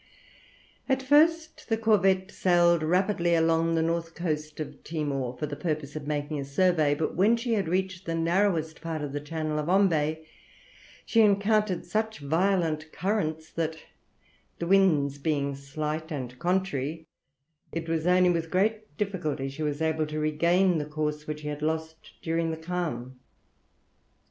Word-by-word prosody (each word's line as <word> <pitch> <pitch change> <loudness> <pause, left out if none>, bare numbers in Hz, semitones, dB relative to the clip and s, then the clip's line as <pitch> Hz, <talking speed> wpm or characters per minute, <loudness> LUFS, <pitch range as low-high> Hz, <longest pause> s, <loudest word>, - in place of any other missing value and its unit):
At 265 0 +1
first 315 +3 +3
the 225 - +2
corvette 195 -3 +2
sailed 175 -2 +3
rapidly 175 +1 +2
along 165 0 +2
the 160 - +2
north 165 0 -2
coast 155 -3 -3
of 155 - -7
Timor, 140 -6 -3
for 150 - -2
the 145 -1 -5
purpose 150 -3 -3
of 150 -2 -6
making 150 0 -2
a - - -2
survey, 150 0 +2
but 155 - -2
when 210 +6 +4
she 230 0 -1
had 200 -5 0
reached 185 +1 -2
the 165 - -1
narrowest 165 -1 +1
part 160 -2 -4
of 145 - -4
the 145 - -2
Channel 155 +1 -3
of 150 +2 -3
Ombay, 160 -5 +2 0.8
she 230 - +4
encountered 205 -2 +2
such 220 0 -1
violent 160 0 0
currents 160 -6 -2
that 160 -1 -2 0.8
the 170 - -3
winds 160 -7 +3
being 140 -1 0
slight 150 +4 -4
and 125 -4 -5
contrary 165 -4 -1 0.7
it 165 0 -4
was 165 0 -1
only 180 0 +5
with 165 -1 -1
great 215 +4 0
difficulty 175 -10 -2
she 140 +3 -8
was 150 0 -1
able 160 -1 0
to 155 0 -5
regain 170 +4 +2
the 150 - -3
course 150 0 -3
which 150 0 -4
she 150 - -6
had 150 0 -4
lost 160 +1 -3
during 165 -1 0
the 160 - -3
calm. 160 -7 -4
160 Hz, 160 wpm, -27 LUFS, 150-185 Hz, 0.8 s, only